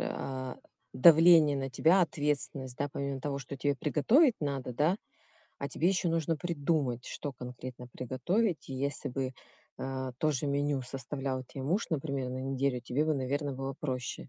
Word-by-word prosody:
а, 130 Hz, -1 st, -4 dB, 0.4 s
давление 160 Hz, +1 st, +7 dB
на 135 Hz, -1 st, -3 dB
тебя, 180 Hz, +7 st, +4 dB
ответственность, 145 Hz, -5 st, -2 dB
да, 145 Hz, -, -1 dB
помимо 140 Hz, -1 st, -3 dB
того, 140 Hz, 0 st, -2 dB
что 140 Hz, +1 st, -7 dB
тебе 145 Hz, +2 st, +1 dB
приготовить 215 Hz, -, +4 dB
надо, 135 Hz, -4 st, -2 dB
да, 155 Hz, +9 st, +2 dB, 0.6 s
а 140 Hz, -, -3 dB
тебе 165 Hz, +6 st, +1 dB
ещё 185 Hz, -2 st, +1 dB
нужно 165 Hz, -1 st, 0 dB
придумать, 145 Hz, -7 st, -1 dB
что 145 Hz, -, -5 dB
конкретно 125 Hz, 0 st, -8 dB
приготовить. 140 Hz, -, -1 dB
И 135 Hz, -, -5 dB
если 140 Hz, +2 st, -2 dB
бы, 130 Hz, 0 st, -2 dB, 0.5 s
а, 130 Hz, -1 st, -3 dB
то 155 Hz, -, +2 dB
же 145 Hz, 0 st, -1 dB
меню 140 Hz, -1 st, 0 dB
составлял 130 Hz, +1 st, -4 dB
те 135 Hz, +2 st, -8 dB
муж, 175 Hz, +11 st, 0 dB
например, 140 Hz, -4 st, -2 dB
на 130 Hz, +1 st, -4 dB
неделю, 135 Hz, -1 st, -1 dB
тебе 125 Hz, +5 st, 0 dB
бы, 155 Hz, 0 st, +1 dB
наверно, 140 Hz, +1 st, -1 dB
было 135 Hz, +1 st, -4 dB
проще. 130 Hz, -4 st, -4 dB
140 Hz, 165 wpm, -31 LUFS, 130-155 Hz, 0.6 s, давление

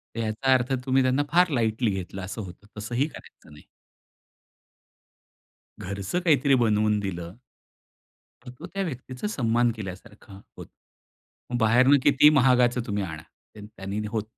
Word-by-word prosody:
तर 115 Hz, -, -4 dB
याचा 115 Hz, +4 st, +1 dB
अर्थ 130 Hz, +1 st, +1 dB
तुम्ही 130 Hz, 0 st, +2 dB
त्यांना 130 Hz, +3 st, +1 dB
फार 180 Hz, 0 st, +4 dB
लाईटली 115 Hz, -3 st, 0 dB
घेतलं 95 Hz, 0 st, -5 dB
असं 95 Hz, +4 st, -6 dB
होतं. 95 Hz, +1 st, -11 dB
तसंही 120 Hz, +7 st, -1 dB
करायचं 150 Hz, -, -15 dB
नाही. 75 Hz, -, -15 dB, 2.2 s
घरचं 100 Hz, -, -3 dB
काहीतरी 145 Hz, -5 st, +3 dB
बनवून 105 Hz, -3 st, +2 dB
दिलं 90 Hz, -3 st, -5 dB, 1.1 s
तर -, -, -9 dB
तो 170 Hz, -, -8 dB
त्या 195 Hz, 0 st, -1 dB
व्यक्तीचा 130 Hz, -, -6 dB
सन्मान 120 Hz, -, +1 dB
केल्यासारखा 105 Hz, 0 st, -10 dB, 0.2 s
होतं. -, -, -10 dB, 0.8 s
मग 120 Hz, -, 0 dB
बाहेरनं 125 Hz, +6 st, +5 dB
कितीही 145 Hz, +1 st, +6 dB
महागाचं 125 Hz, -2 st, +3 dB
तुम्ही 100 Hz, -1 st, -2 dB
आणा. 80 Hz, -4 st, -6 dB, 0.3 s
तर 105 Hz, -, -10 dB
त्यांनी 105 Hz, 0 st, -6 dB
होत 110 Hz, -1 st, -3 dB
115 Hz, 140 wpm, -25 LUFS, 105-130 Hz, 2.2 s, कितीही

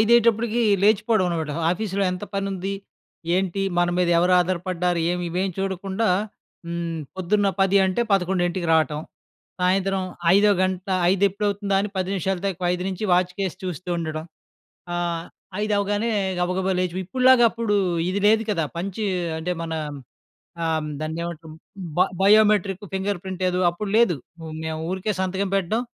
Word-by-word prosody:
ఐదయ్యేటప్పుడుకీ 235 Hz, 0 st, +3 dB, 0.2 s
లేచిపోడవనమాట. 195 Hz, -7 st, +2 dB, 0.2 s
ఆఫీస్‌లో 200 Hz, +1 st, -1 dB
ఎంత 180 Hz, -, -5 dB
పనుంది? 195 Hz, 0 st, -2 dB, 0.6 s
ఏంటి? 195 Hz, +1 st, -1 dB, 0.2 s
మన 175 Hz, 0 st, +3 dB
మీదెవరు 175 Hz, 0 st, +3 dB
ఆధారపడ్డారు? 180 Hz, -1 st, -1 dB
ఏమి 180 Hz, 0 st, -2 dB
ఇవేమి 185 Hz, +2 st, -1 dB
చూడకుండా, 195 Hz, +3 st, -1 dB, 0.6 s
హ్మ్. 170 Hz, -1 st, -3 dB, 0.2 s
పొద్దున్న 200 Hz, +2 st, +1 dB
10 195 Hz, +1 st, +4 dB
అంటే 190 Hz, +6 st, 0 dB
11:00 180 Hz, -2 st, +1 dB
రాటం. 155 Hz, -1 st, +1 dB, 0.6 s
సాయంత్రం 190 Hz, +1 st, +1 dB, 0.3 s
ఐదో 210 Hz, +1 st, +5 dB
గంట 185 Hz, 0 st, -1 dB, 0.3 s
ఐదెప్పుడవుతుందా 200 Hz, 0 st, +1 dB
అని 210 Hz, -, -2 dB
4:50 185 Hz, -1 st, -1 dB
నుంచి 190 Hz, +3 st, -4 dB
వాచ్‌కేసి 180 Hz, +1 st, 0 dB
చూస్తూ 180 Hz, 0 st, -5 dB
ఉండడం. 155 Hz, -1 st, -4 dB, 0.7 s
ఆహ్, 170 Hz, -1 st, -2 dB, 0.4 s
ఐదవ్వగానే 205 Hz, +1 st, 0 dB, 0.3 s
గబగబా 185 Hz, +2 st, 0 dB
లేచి 180 Hz, -2 st, -1 dB
వ్ -, -, -1 dB
ఇప్పడులాగప్పుడూ 235 Hz, -1 st, +4 dB, 0.3 s
ఇది 200 Hz, +2 st, -1 dB
లేదు 220 Hz, +1 st, +4 dB
కదా! 170 Hz, -6 st, +1 dB
పంచ్ 190 Hz, +4 st, -4 dB, 0.4 s
అంటే 170 Hz, +3 st, -3 dB
మనా 160 Hz, -1 st, -3 dB, 0.8 s
ఆహ్, 160 Hz, -1 st, +1 dB
హ్మ్, 150 Hz, -, -5 dB
"దాన్నేమంటాం?" 160 Hz, 0 st, -5 dB, 0.4 s
బ -, -, +2 dB, 0.2 s
బయోమెట్రిక్, 205 Hz, -2 st, +4 dB
ఫింగర్ 190 Hz, -1 st, -1 dB
ప్రింటేదో 185 Hz, -1 st, -1 dB
అప్పుడు 195 Hz, +4 st, -5 dB
లేదు. 215 Hz, -10 st, +4 dB, 0.3 s
మ్ 160 Hz, -1 st, -7 dB
మేవూరికే 175 Hz, +6 st, -2 dB
సంతకం 190 Hz, +1 st, -1 dB
పెట్టడం. 195 Hz, +5 st, 0 dB
190 Hz, 125 wpm, -23 LUFS, 175-200 Hz, 0.8 s, ఐదో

